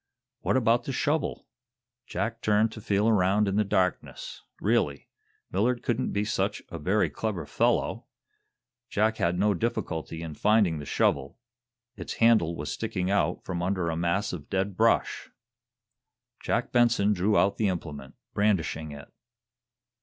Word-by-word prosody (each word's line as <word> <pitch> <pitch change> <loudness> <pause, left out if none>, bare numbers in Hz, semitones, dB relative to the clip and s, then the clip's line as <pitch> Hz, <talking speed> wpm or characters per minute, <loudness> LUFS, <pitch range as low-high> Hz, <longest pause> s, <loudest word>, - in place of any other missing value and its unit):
What - - +1
about 120 -1 +2
the - - -3
shovel? 145 +4 -1 0.6
Jack 115 0 -3
turned 110 +1 +2
to 110 - -9
feel 105 +1 +1
around 105 -1 +3
in 100 - 0
the 105 - +3
darkness. 95 -3 -2 0.2
Really, - - 0 0.4
Millard 120 +6 +1
couldn't 120 +1 0
be 100 +1 0
such - - -1
a 85 - -6
very 95 +7 +2
clever 100 -8 -3
fellow! 70 - 0 0.8
Jack 110 +2 +1
had 85 +1 +1
no 105 +2 +3
difficulty 85 -6 -3
in 80 -2 -6
finding 100 -3 +2
the 75 - -8
shovel. 70 -1 0 0.6
Its 90 -6 -6
handle 110 -8 +4
was 75 -1 -4
sticking 90 +1 -2
out 100 - 0
from 90 -2 -3
under 90 -2 0
a - - -2
mass 85 +5 0
of 75 -5 -7
dead 95 0 -1
brush. - - +1 1.1
Jack - - -1
Benson 120 -4 +3
drew 100 +2 +2
out 100 - +3
the 110 - +1
implement, 75 -7 -5 0.2
brandishing 85 -6 0
it. 70 -1 -11
100 Hz, 145 wpm, -27 LUFS, 85-110 Hz, 1.1 s, handle